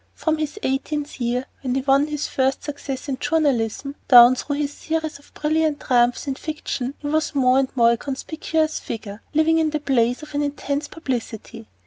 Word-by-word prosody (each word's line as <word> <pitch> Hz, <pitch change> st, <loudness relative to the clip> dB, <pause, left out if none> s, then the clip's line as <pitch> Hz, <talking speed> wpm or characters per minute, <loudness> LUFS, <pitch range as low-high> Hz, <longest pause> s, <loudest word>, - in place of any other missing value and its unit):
From 315 Hz, -1 st, 0 dB
his 310 Hz, +5 st, -3 dB
eighteenth 285 Hz, +1 st, -2 dB
year, 245 Hz, +2 st, 0 dB, 0.2 s
when 255 Hz, -2 st, -2 dB
he 270 Hz, -, +1 dB
won 275 Hz, +2 st, +3 dB
his 300 Hz, -1 st, -3 dB
first 265 Hz, 0 st, 0 dB
success 285 Hz, -2 st, -5 dB
in 265 Hz, -2 st, -3 dB
journalism, 275 Hz, -4 st, 0 dB
down 245 Hz, -1 st, +9 dB
through 285 Hz, +3 st, -3 dB
his 290 Hz, 0 st, -2 dB
series 315 Hz, -2 st, -3 dB
of 285 Hz, -, -22 dB
brilliant 310 Hz, -1 st, +1 dB
triumphs 245 Hz, -2 st, +2 dB
in 275 Hz, -, -1 dB
fiction, 280 Hz, -3 st, -4 dB
he 290 Hz, -, -6 dB
was 310 Hz, 0 st, 0 dB
more 260 Hz, -1 st, +4 dB
and 265 Hz, -1 st, 0 dB
more 235 Hz, -2 st, +5 dB
a 235 Hz, -, +1 dB
conspicuous 310 Hz, +4 st, -2 dB
figure, 215 Hz, -2 st, -7 dB
living 320 Hz, +1 st, +4 dB
in 315 Hz, -1 st, +2 dB
the 305 Hz, 0 st, -2 dB
blaze 250 Hz, -2 st, +1 dB
of 305 Hz, -, -11 dB
an 290 Hz, -, 0 dB
intense 285 Hz, 0 st, -2 dB
publicity. 240 Hz, -, -5 dB
280 Hz, 185 wpm, -22 LUFS, 255-305 Hz, 0.2 s, down